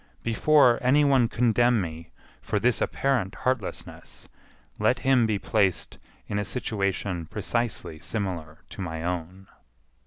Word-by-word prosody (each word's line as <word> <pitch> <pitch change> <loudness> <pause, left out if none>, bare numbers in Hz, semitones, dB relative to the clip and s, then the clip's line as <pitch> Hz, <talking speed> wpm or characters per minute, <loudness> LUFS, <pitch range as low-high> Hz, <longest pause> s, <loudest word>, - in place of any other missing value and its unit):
Before 125 +1 +4
any 140 +4 +4
one 135 -4 +4
condemn 120 0 +2
me 80 -2 -6 0.3
for - - -1
this - - +1
apparent 125 -7 0
heartlessness, 130 -6 -4 0.5
let 110 +4 +3
him 130 -4 +4
be 105 -2 0
placed 95 -4 0 0.3
in 105 - -2
a - - -1
situation 100 -5 -2
precisely 105 -6 -2
similar 85 -4 -4
to - - -8
my 80 -3 -4
own. 90 +2 -4
105 Hz, 125 wpm, -26 LUFS, 90-120 Hz, 0.5 s, Before